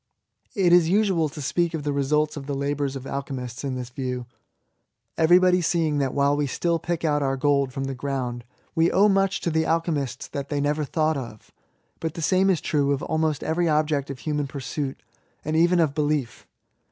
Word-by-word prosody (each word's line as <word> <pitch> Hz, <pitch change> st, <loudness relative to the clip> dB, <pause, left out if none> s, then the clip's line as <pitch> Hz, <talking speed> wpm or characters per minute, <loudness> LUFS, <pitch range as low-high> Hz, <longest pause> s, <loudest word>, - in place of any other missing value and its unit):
It 185 Hz, -4 st, +3 dB
is 175 Hz, -2 st, +5 dB
usual 190 Hz, -5 st, +2 dB
to 150 Hz, +1 st, -8 dB
speak 170 Hz, +4 st, 0 dB
of 155 Hz, -, -4 dB
the 145 Hz, -, -1 dB
resultsK 150 Hz, +2 st, +1 dB
of 140 Hz, -2 st, -7 dB
the 140 Hz, -, -2 dB
labours 140 Hz, 0 st, -1 dB
of 135 Hz, -1 st, -7 dB
alchemists 135 Hz, -3 st, -5 dB
in 135 Hz, -2 st, -2 dB
thiB 125 Hz, -1 st, -6 dB
view, 125 Hz, -2 st, -3 dB, 0.9 s
everybody 180 Hz, +2 st, +5 dB
seeing 160 Hz, -3 st, +1 dB
that 135 Hz, -2 st, -1 dB
while 140 Hz, 0 st, +3 dB
we 145 Hz, -1 st, 0 dB
still 170 Hz, +5 st, 0 dB
pick 170 Hz, +1 st, -3 dB
out 150 Hz, -1 st, +2 dB
our 135 Hz, -1 st, 0 dB
gold 140 Hz, -1 st, +2 dB
from 135 Hz, +1 st, -4 dB
the 135 Hz, 0 st, -3 dB
ground, 130 Hz, -3 st, -3 dB, 0.3 s
we 165 Hz, 0 st, +3 dB
owe 200 Hz, +2 st, +4 dB
much 195 Hz, -1 st, +2 dB
to 170 Hz, -, -1 dB
the 160 Hz, 0 st, +1 dB
alchemists 155 Hz, -6 st, -1 dB
that 140 Hz, -2 st, -5 dB
they 145 Hz, -, -1 dB
never 150 Hz, +1 st, 0 dB
thought 155 Hz, +1 st, 0 dB
of. 115 Hz, -5 st, -9 dB, 0.5 s
But 160 Hz, -1 st, -4 dB
the 165 Hz, -, -5 dB
same 190 Hz, +3 st, +3 dB
is 180 Hz, -5 st, +2 dB
true 140 Hz, -2 st, +1 dB
of 140 Hz, -, -3 dB
almost 160 Hz, -2 st, 0 dB
every 170 Hz, +1 st, +1 dB
object 150 Hz, -2 st, +1 dB
of 135 Hz, -, -5 dB
human 150 Hz, 0 st, -2 dB
pursuit, 135 Hz, 0 st, -5 dB, 0.4 s
and 155 Hz, +1 st, -1 dB
even 175 Hz, +2 st, +4 dB
of 155 Hz, -4 st, +2 dB
belief. 145 Hz, -5 st, -2 dB
150 Hz, 200 wpm, -24 LUFS, 135-165 Hz, 0.9 s, is